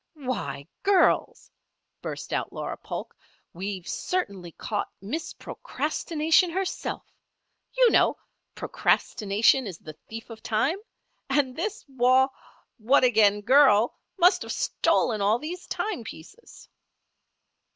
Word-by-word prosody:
"Why, 155 - -4
girls!" 395 -2 +2 0.5
burst - - -6
out - - -2
Laura - - -5
Polk. - - -7 0.4
"We've 190 0 -5
certainly 200 - -3
caught 210 -2 -3
Miss 280 +12 -4
Procrastination 325 +2 0
herself. 375 +2 -3 0.7
You - - +6
know, - - +4 0.4
'procrastination 220 +4 +2
is 180 -4 -7
the 155 - -10 0.2
thief 225 +1 -8
of 220 - -10
time,' 275 - 0 0.5
and 270 -2 +1
this 420 +6 -4
Wau 260 0 +3 0.5
what 255 +5 +4
again 210 -4 +4
girl 245 -2 +5 0.2
must 360 +1 +5
have - - -5
stolen 215 -4 +1
all 205 +3 +3
these 335 +7 -7
timepieces." 400 - -6
255 Hz, 110 wpm, -26 LUFS, 205-325 Hz, 0.7 s, You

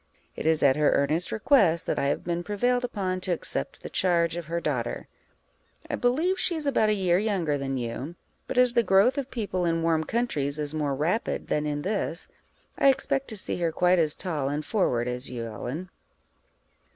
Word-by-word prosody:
It - - -3
is 160 -1 +4
at 135 0 +5
her 150 -1 +3
earnest 155 +5 +1
request 210 - +3
that - - -1
I - - 0
have 140 - -1
been 170 0 -2
prevailed 245 +7 0
upon 190 -6 -2
to 185 - -2
accept 110 - -3
the - - -6
charge 170 -3 +2
of 175 -1 -5
her 170 +2 -2
daughter. 130 -8 -3 0.8
I - - 0
believe 320 +10 +1
she 355 - +1
is 310 -2 -4
about 245 -6 +2
a - - +3
year 180 -3 +2
younger 190 -8 0
than 135 -1 -3
you; 125 +7 -5 0.3
but - - -4
as 250 -1 +5
the 240 - +4
growth 205 +6 +3
of 275 -1 -5
people 205 -7 -2
in 165 -1 0
warm 165 -1 +2
countries 155 - -1
is 150 0 -1
more 145 -3 -1
rapid 170 - -1
than 150 0 0
in 145 0 -2
this, 195 -3 -2 0.5
I 275 - +6
expect 275 0 0
to 220 - -4
see - - -1
her 170 -2 0
quite 180 +2 +3
as 155 -3 +2
tall 155 -7 -2
and 145 +1 -3
forward 125 - 0
as 125 +1 -3
you, 120 -2 -5
Ellen. 130 - -6
170 Hz, 200 wpm, -26 LUFS, 150-215 Hz, 0.8 s, I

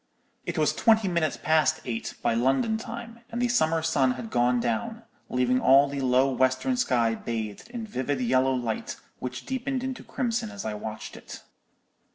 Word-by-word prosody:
"It - - -3
was - - +3
twenty 220 -3 +3
minutes 170 -3 0
past 155 0 +2
eight 115 -2 -4
by - - +2
London 135 - +2
time, 230 +1 -8
and 235 - -4
the 245 - +2
summer 165 -9 +2
sun 140 -5 +2
had 125 -3 -7
gone 125 0 +2
down, 115 -3 -2 0.3
leaving 125 0 +2
all 135 +2 +6
the 140 0 -4
low 130 +1 +3
western 130 - +1
sky 120 - +2
bathed 115 - -5
in 240 -2 -5
vivid 140 - -2
yellow 130 +2 +2
light, 120 -3 -3 0.2
which 130 0 -5
deepened 265 0 -2
into 260 -1 -4
crimson 235 -2 -2
as 200 -1 -7
I 110 - -2
watched 110 -1 -6
it. - - -10
135 Hz, 175 wpm, -27 LUFS, -, 0.3 s, all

